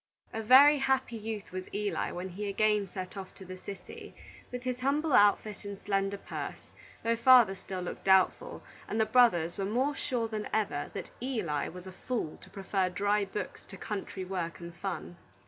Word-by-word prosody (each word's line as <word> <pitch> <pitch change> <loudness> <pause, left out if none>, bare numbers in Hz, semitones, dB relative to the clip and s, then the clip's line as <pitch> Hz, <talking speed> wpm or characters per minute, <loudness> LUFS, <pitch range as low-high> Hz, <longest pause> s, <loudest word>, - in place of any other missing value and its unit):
A 225 - -2
very 275 +6 +8
happy 265 -3 +1
youth 220 -2 -5
was 185 0 -5
Eli 205 0 -1
when 180 +2 -5
he 200 +3 -5
again 210 0 +2
set 185 0 -6
off 190 -1 -8
to 190 - -11
the 185 0 -8
city, 195 +1 -9 0.4
with 250 0 -5
his 255 -1 -2
humble 285 +3 +1
outfit 205 0 +4
and 200 -1 -6
slender 195 0 -1
purse, - - -7 0.3
though 230 0 +2
father 235 -3 +7
still 190 -1 -6
looked 180 - -6
doubtful, 190 -1 +3 0.2
and 220 - -2
the 220 - +4
brothers 180 -10 +4
were - - 0
more 255 +8 0
sure 240 -4 -1
than 215 -1 -4
ever 200 -10 -1
that - - -6
Eli 205 - -1
was 180 +1 -9
a 190 - -8
fool 190 -3 -4
to - - -16
prefer 195 -1 -1
dry 205 +2 +1
books 195 +2 -6
to 195 - -10
country 195 -1 -5
work 180 -3 -4
and 170 0 -8
fun. 175 -1 -5
205 Hz, 185 wpm, -30 LUFS, 185-230 Hz, 0.4 s, very